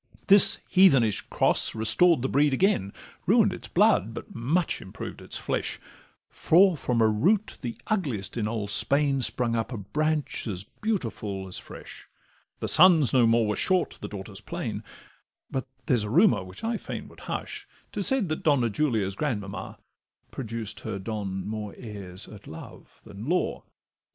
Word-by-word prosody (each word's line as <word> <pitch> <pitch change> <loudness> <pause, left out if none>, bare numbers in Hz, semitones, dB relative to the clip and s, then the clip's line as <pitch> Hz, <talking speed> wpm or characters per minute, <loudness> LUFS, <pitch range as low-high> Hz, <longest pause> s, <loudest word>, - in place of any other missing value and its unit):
This 200 0 +8
heathenish 135 - +4
cross - - +1
restored 140 +7 +3
the - - +1
breed 140 0 +2
again, 130 - +1 0.4
Ruin'd - - +4
its - - -6
blood, 110 +5 +2
but 120 - -9
much 145 +9 0
improved 95 - -8
its - - -3
flesh; - - -2 0.5
For 185 +2 +3
from 125 -5 -1
a - - +5
root 185 - +1
the 120 -4 -5
ugliest 135 - -2
in 110 -3 -1
Old 105 -2 -2
Spain 140 +6 +3
Sprung 120 -1 +1
up 115 +2 -2
a 120 - -4
branch 150 +9 -2
as 95 -3 -4
beautiful 110 - -4
as 90 - -5
fresh; - - -12 0.5
The - - -2
sons 165 - +6
no 125 -3 +5
more 115 0 +3
were 105 0 -1
short, 185 -1 0
the - - -5
daughters 95 -2 -7
plain: - - -5 0.7
But 130 -1 -3 0.2
there's 125 -4 +2
a 105 - -4
rumour 105 -3 +4
which 90 0 -11
I 225 0 -1
fain - - -7
would - - -16
hush, - - -5 0.2
'Tis 200 -2 -2
said 260 -10 +1
that 155 - -3
Donna 130 -7 +2
Julia's 110 -8 0
grandmamma 105 -9 -4 0.5
Produced 115 -4 -6
her - - -5
Don 95 -2 -5
more 105 -1 -5
heirs 100 -5 -9
at 105 -1 -13
love 80 +1 -12
than 105 +4 -9
law. 180 +1 -1
115 Hz, 160 wpm, -26 LUFS, 105-155 Hz, 0.7 s, This